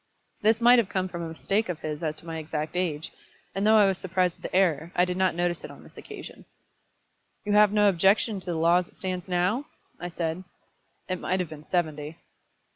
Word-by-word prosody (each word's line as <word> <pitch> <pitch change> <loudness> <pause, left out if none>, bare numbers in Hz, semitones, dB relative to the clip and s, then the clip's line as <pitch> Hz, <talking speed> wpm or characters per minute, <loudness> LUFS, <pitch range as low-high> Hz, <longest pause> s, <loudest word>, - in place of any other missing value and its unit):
This 220 +2 +3
might 240 +1 +7
have 210 -4 0
come 185 -2 -1
from 175 -2 -6
a 165 - -4
mistake 195 +6 -1
of 165 -3 -4
his 150 0 -4
as 155 -2 -2
to 160 - -5
my 165 -1 -5
exact 155 +1 -4
age; 160 -4 -2 0.4
and 195 +2 0
though 220 0 +6
I 210 - +7
was 195 -1 +1
surprised 185 -1 0
at - - -23
the - - -4
error, 170 -3 +2
I 180 - +4
did 180 0 -3
not 185 -2 +1
notice 175 0 -1
it - - -7
on - - -13
this - - -17
occasion. - - -10 1.0
"You 205 - -1
have 210 -1 +6
no 210 -1 +4
objection 195 +3 +3
to 185 - -15
the 175 - -1
law 170 +2 +4
as 180 -1 -1
it - - -23
stands 185 -1 -4
now?" 185 +10 +1 0.3
I 175 - -4
said. 170 +1 -3 0.6
"It 185 -1 -2
might 185 +1 -1
have 180 -3 -2
been 155 -1 -10
seventy." 155 -3 -2
180 Hz, 225 wpm, -27 LUFS, 165-195 Hz, 1.0 s, might